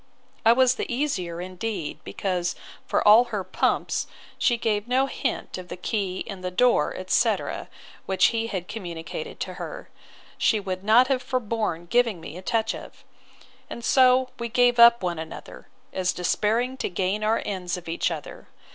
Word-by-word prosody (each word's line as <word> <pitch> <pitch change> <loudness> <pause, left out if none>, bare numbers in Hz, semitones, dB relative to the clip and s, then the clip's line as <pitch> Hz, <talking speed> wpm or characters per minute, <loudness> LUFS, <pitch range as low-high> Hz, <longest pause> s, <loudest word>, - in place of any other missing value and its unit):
I 225 - +7
was 255 +1 +5
the - - -4
easier, 200 - -2
indeed, 185 -1 -4
because, 180 -2 -2 0.3
for - - +1
all 220 +4 +8
her 210 -5 -3
pumps, - - 0 0.3
she 240 -3 +3
gave 215 -1 -1
no 260 +2 +3
hints 260 -7 -3
of 180 - -9
the - - -7
key 190 -2 -2
and 195 -4 -8
the 180 - -1
door, 245 +7 +2
etc. - - 0 0.4
which, 190 -1 +4
had 230 0 -2
he 190 - -2
communicated 175 -4 -7
to - - -3
her, - - -7 0.5
she 220 - +3
would 190 -1 -4
not 230 +5 +6
have 260 -2 +1
forborne 220 -10 -2
giving 230 0 +2
me 155 -1 -9
a 180 - -7
touch 225 +3 0
of.—And 235 - -13
so 255 -1 +5
we 235 0 -3
gave 245 +1 +3
up 235 -2 +8
one 175 -2 -1
another, 160 0 -9 0.3
as 185 -1 0
despairing 225 +8 0
to - - -2
gain 190 +4 -1
our 220 +1 +1
ends 185 -3 -3
of 175 - -11
each 165 +2 0
other. 160 -3 -7
210 Hz, 165 wpm, -25 LUFS, 180-240 Hz, 0.5 s, all